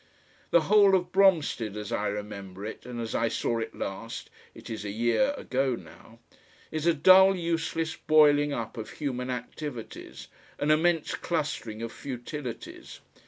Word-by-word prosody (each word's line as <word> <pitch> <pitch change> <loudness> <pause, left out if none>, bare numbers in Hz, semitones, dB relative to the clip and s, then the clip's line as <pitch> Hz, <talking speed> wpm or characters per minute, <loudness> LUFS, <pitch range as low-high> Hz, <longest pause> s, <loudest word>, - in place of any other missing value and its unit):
The 170 - +5
whole 200 +3 +5
of 180 -1 -1
Bromstead 160 - +2
as 105 -1 -6
I 105 - 0
remember 100 -2 -6
it, 110 +2 -8
and 120 -1 -6
as 115 -1 -4
I 115 - +1
saw 115 +1 -1
it 115 - -5
last 115 +4 -6 0.2
it - - -12
is 110 -2 -5
a 105 - -4
year 120 - +2
ago 130 -1 0
now 90 +5 -14 0.5
is 155 +1 -2
a 170 - +5
dull 190 +5 +7
useless 165 -2 -2
boiling 145 -1 +4
up 115 -2 -4
of 110 - -6
human 130 -4 -3
activities, 125 0 -7 0.3
an 145 +1 +1
immense 165 +1 +2
clustering 130 -9 -3
of 115 - -4
futilities. 130 -1 -7
130 Hz, 155 wpm, -28 LUFS, 115-165 Hz, 0.5 s, dull